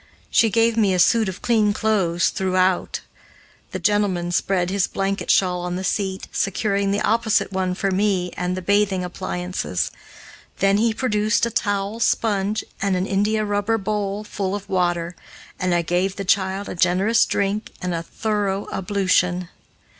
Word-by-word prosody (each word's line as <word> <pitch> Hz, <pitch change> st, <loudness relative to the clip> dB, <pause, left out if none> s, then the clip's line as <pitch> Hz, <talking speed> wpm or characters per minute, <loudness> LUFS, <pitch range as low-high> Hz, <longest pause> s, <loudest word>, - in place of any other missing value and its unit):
She 225 Hz, -, +4 dB
gave 230 Hz, +2 st, +2 dB
me 200 Hz, -4 st, +3 dB
a -, -, 0 dB
suit 220 Hz, +2 st, +4 dB
of 185 Hz, -, -8 dB
clean 215 Hz, -3 st, +3 dB
clothes 195 Hz, -6 st, +1 dB
throughout, 185 Hz, -2 st, 0 dB, 0.7 s
the 190 Hz, -, -4 dB
gentleman 185 Hz, -2 st, +1 dB
spread 180 Hz, 0 st, 0 dB
his 195 Hz, -1 st, +1 dB
blanket 195 Hz, 0 st, -2 dB
shawl 180 Hz, -2 st, +3 dB
on 180 Hz, 0 st, -3 dB
the 185 Hz, -, -4 dB
seat, 190 Hz, -1 st, -2 dB
securing 200 Hz, 0 st, 0 dB
the 200 Hz, +1 st, 0 dB
opposite 225 Hz, -3 st, +1 dB
one 185 Hz, -1 st, -1 dB
for 195 Hz, +1 st, -1 dB
me 190 Hz, -2 st, +1 dB
and 180 Hz, +1 st, -2 dB
the 185 Hz, -, -5 dB
bathing 200 Hz, -1 st, +2 dB
appliances. 180 Hz, -, -3 dB, 0.7 s
Then 195 Hz, +1 st, +3 dB
he 225 Hz, +2 st, +2 dB
produced 215 Hz, -1 st, +1 dB
a 235 Hz, -, -3 dB
towel, 205 Hz, +1 st, -1 dB
sponge, 210 Hz, -2 st, +1 dB, 0.2 s
and 200 Hz, -1 st, +1 dB
an 180 Hz, +1 st, 0 dB
india 210 Hz, +2 st, +1 dB
rubber 205 Hz, +2 st, 0 dB
bowl 205 Hz, 0 st, -2 dB
full 200 Hz, -2 st, -3 dB
of 205 Hz, -, -7 dB
water, 175 Hz, -2 st, 0 dB, 0.4 s
and 185 Hz, 0 st, 0 dB
I 175 Hz, -1 st, +2 dB
gave 180 Hz, +3 st, 0 dB
the 195 Hz, -, -5 dB
child 190 Hz, +1 st, +1 dB
a -, -, -5 dB
generous 185 Hz, +6 st, +3 dB
drink 200 Hz, +2 st, -1 dB
and 180 Hz, -1 st, -3 dB
a 165 Hz, -, -2 dB
thorough 205 Hz, +2 st, -2 dB
ablution. 185 Hz, -2 st, +1 dB
195 Hz, 160 wpm, -22 LUFS, 185-210 Hz, 0.7 s, She